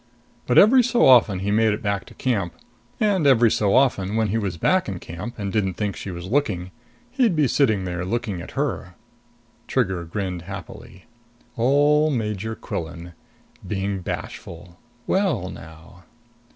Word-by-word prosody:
But 125 Hz, -, +2 dB
every 250 Hz, +6 st, +7 dB
so 245 Hz, 0 st, +2 dB
often 115 Hz, -7 st, +5 dB
he 100 Hz, +1 st, -1 dB
made 110 Hz, 0 st, +3 dB
it 105 Hz, -, -5 dB
back 100 Hz, -2 st, -1 dB
to -, -, -15 dB
camp. 100 Hz, -10 st, -1 dB, 0.4 s
And 200 Hz, -8 st, +2 dB
every 120 Hz, -4 st, +5 dB
so 100 Hz, 0 st, +2 dB
often 110 Hz, -7 st, +2 dB
when 110 Hz, -2 st, +1 dB
he 110 Hz, -, 0 dB
was 95 Hz, -5 st, -3 dB
back 185 Hz, -, +1 dB
in 95 Hz, -, -4 dB
camp 90 Hz, +8 st, -8 dB
and 100 Hz, -2 st, -4 dB
didn't 95 Hz, -4 st, 0 dB
think 105 Hz, 0 st, -2 dB
she -, -, -7 dB
was 85 Hz, -1 st, -6 dB
looking, 95 Hz, -6 st, -1 dB, 0.4 s
he'd 245 Hz, -8 st, +2 dB
be 150 Hz, -3 st, +3 dB
sitting 110 Hz, -8 st, +2 dB
there 90 Hz, -1 st, -3 dB
looking 105 Hz, -2 st, -3 dB
at 90 Hz, -, -11 dB
her. 95 Hz, -11 st, -3 dB, 0.7 s
Trigger 95 Hz, -2 st, 0 dB
grinned 90 Hz, 0 st, -4 dB
happily. 90 Hz, +2 st, -10 dB, 0.5 s
Ole 145 Hz, +5 st, +3 dB
Major 110 Hz, -4 st, -2 dB
Quillan 85 Hz, -1 st, -6 dB, 0.5 s
being 100 Hz, -1 st, -2 dB
bashful! 85 Hz, 0 st, -7 dB, 0.3 s
Well 175 Hz, -, 0 dB
now! 80 Hz, +3 st, -13 dB
105 Hz, 155 wpm, -23 LUFS, 90-130 Hz, 0.7 s, every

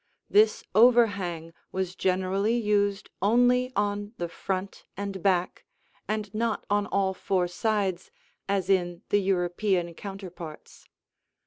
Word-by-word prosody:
This 215 Hz, +1 st, +4 dB
overhang 200 Hz, -8 st, +3 dB, 0.2 s
was 185 Hz, -1 st, -2 dB
generally 190 Hz, +4 st, +1 dB
used 205 Hz, -2 st, 0 dB
only 245 Hz, +4 st, +3 dB
on 205 Hz, +1 st, -1 dB
the 175 Hz, -, -2 dB
front 190 Hz, +3 st, -4 dB
and 200 Hz, -2 st, -4 dB
back 185 Hz, -2 st, +1 dB, 0.4 s
and 215 Hz, -2 st, -3 dB
not 225 Hz, 0 st, -1 dB
on 205 Hz, 0 st, +2 dB
all 195 Hz, -1 st, +1 dB
four 185 Hz, -1 st, 0 dB
sides, 195 Hz, -1 st, -1 dB, 0.4 s
as 195 Hz, -2 st, 0 dB
in 175 Hz, -3 st, +1 dB
the 205 Hz, -, +3 dB
European 180 Hz, -1 st, 0 dB
counterparts. 180 Hz, -4 st, -9 dB
195 Hz, 115 wpm, -27 LUFS, 185-210 Hz, 0.4 s, This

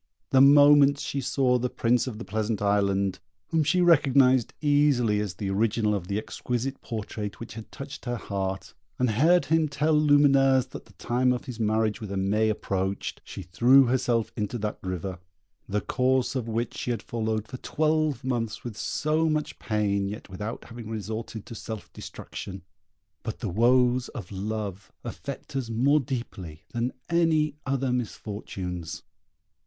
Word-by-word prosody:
The 130 Hz, -, +6 dB
moment 145 Hz, 0 st, +7 dB
she 140 Hz, 0 st, -3 dB
saw 125 Hz, -1 st, +2 dB
the 125 Hz, +1 st, -1 dB
Prince 120 Hz, +2 st, +1 dB
of 115 Hz, -4 st, -5 dB
the 115 Hz, -, -7 dB
Pleasant 110 Hz, 0 st, -1 dB
Island, 100 Hz, -1 st, +1 dB, 0.3 s
whom 160 Hz, -1 st, +2 dB
she 180 Hz, +5 st, +2 dB
recognised 135 Hz, -7 st, +4 dB
easily 145 Hz, -8 st, +3 dB
as 105 Hz, -3 st, -3 dB
the 100 Hz, -2 st, -3 dB
original 105 Hz, +1 st, +1 dB
of 95 Hz, -4 st, -3 dB
the 100 Hz, +1 st, -1 dB
exquisite 125 Hz, +4 st, -3 dB
portrait 105 Hz, -3 st, -5 dB
which 115 Hz, -, -8 dB
had 110 Hz, 0 st, -10 dB
touched 140 Hz, 0 st, -8 dB
her 120 Hz, -1 st, -1 dB
heart, 95 Hz, -3 st, -4 dB, 0.2 s
and 125 Hz, -2 st, +2 dB
heard 165 Hz, +11 st, +4 dB
him 160 Hz, 0 st, +2 dB
tell 150 Hz, +3 st, +1 dB
Lumineuse 140 Hz, -3 st, +4 dB
that -, -, -9 dB
the 110 Hz, -, -20 dB
time 125 Hz, +7 st, +1 dB
of 125 Hz, -, -2 dB
his 125 Hz, -4 st, -7 dB
marriage 110 Hz, 0 st, +1 dB
with 105 Hz, -, -6 dB
Aimée 100 Hz, +3 st, +1 dB
approached, 95 Hz, -2 st, -2 dB
she 95 Hz, -, -8 dB
threw 125 Hz, +10 st, +5 dB
herself 120 Hz, -2 st, +1 dB
into 105 Hz, +3 st, -2 dB
that 105 Hz, -1 st, -3 dB
river, 95 Hz, 0 st, -4 dB, 0.5 s
the 105 Hz, +1 st, 0 dB
course 130 Hz, 0 st, +1 dB
of 125 Hz, -4 st, -3 dB
which 115 Hz, +1 st, -2 dB
she -, -, -4 dB
had 120 Hz, -, -2 dB
followed 110 Hz, -4 st, -2 dB
for 130 Hz, -, -7 dB
twelve 155 Hz, -2 st, 0 dB
months 115 Hz, -4 st, -2 dB
with 120 Hz, -4 st, -6 dB
so 155 Hz, +8 st, 0 dB
much 155 Hz, -1 st, -2 dB
pain, 100 Hz, -3 st, 0 dB
yet 105 Hz, 0 st, -8 dB
without 105 Hz, +5 st, -5 dB
having 115 Hz, -2 st, -9 dB
resorted 110 Hz, 0 st, -5 dB
to -, -, -9 dB
self 110 Hz, -1 st, -7 dB
destruction; 95 Hz, -2 st, -8 dB, 0.6 s
but 110 Hz, -1 st, -5 dB
the 110 Hz, -, -4 dB
woes 125 Hz, +5 st, +3 dB
of 105 Hz, -9 st, -8 dB
love 100 Hz, -1 st, -4 dB
affect -, -, -7 dB
us 130 Hz, -4 st, -2 dB
more 135 Hz, +7 st, +3 dB
deeply 110 Hz, -, -6 dB
than 120 Hz, +1 st, -1 dB, 0.2 s
any 160 Hz, -3 st, +2 dB
other 135 Hz, -1 st, 0 dB
misfortunes. 95 Hz, -7 st, -5 dB
115 Hz, 160 wpm, -27 LUFS, 105-135 Hz, 0.6 s, moment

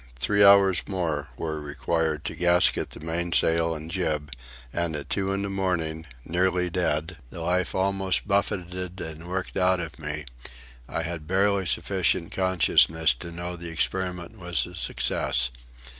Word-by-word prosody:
Three 100 Hz, +12 st, +3 dB
hours 100 Hz, -2 st, +7 dB
more 80 Hz, -7 st, -2 dB
were 80 Hz, -1 st, -3 dB
required 75 Hz, +1 st, -1 dB
to -, -, -3 dB
gasket 90 Hz, 0 st, +3 dB
the -, -, -10 dB
mainsail 85 Hz, 0 st, +1 dB
and 80 Hz, +1 st, -7 dB
jib, 75 Hz, -6 st, -1 dB, 0.4 s
and 85 Hz, -2 st, -1 dB
at 75 Hz, -, -5 dB
two 95 Hz, -1 st, 0 dB
in 100 Hz, 0 st, -1 dB
the 100 Hz, -, -2 dB
morning, 80 Hz, -5 st, -1 dB, 0.2 s
nearly 90 Hz, +1 st, +1 dB
dead, 80 Hz, -1 st, -1 dB
the -, -, -9 dB
life 90 Hz, +2 st, 0 dB
almost 95 Hz, 0 st, +1 dB
buffeted 90 Hz, -2 st, -1 dB
and 80 Hz, +1 st, -7 dB
worked 95 Hz, +1 st, -3 dB
out 95 Hz, 0 st, +3 dB
of 85 Hz, 0 st, -6 dB
me, 75 Hz, -1 st, -4 dB, 0.6 s
I 80 Hz, -, -2 dB
had 80 Hz, -2 st, -5 dB
barely 95 Hz, +1 st, +2 dB
sufficient 90 Hz, -3 st, +1 dB
consciousness 80 Hz, -4 st, +4 dB
to 85 Hz, -, -7 dB
know 85 Hz, +1 st, -5 dB
the 85 Hz, -1 st, -7 dB
experiment 90 Hz, +4 st, -2 dB
was 85 Hz, -7 st, -1 dB
a 90 Hz, -, -11 dB
success. 65 Hz, -6 st, 0 dB
85 Hz, 150 wpm, -26 LUFS, 80-95 Hz, 0.6 s, hours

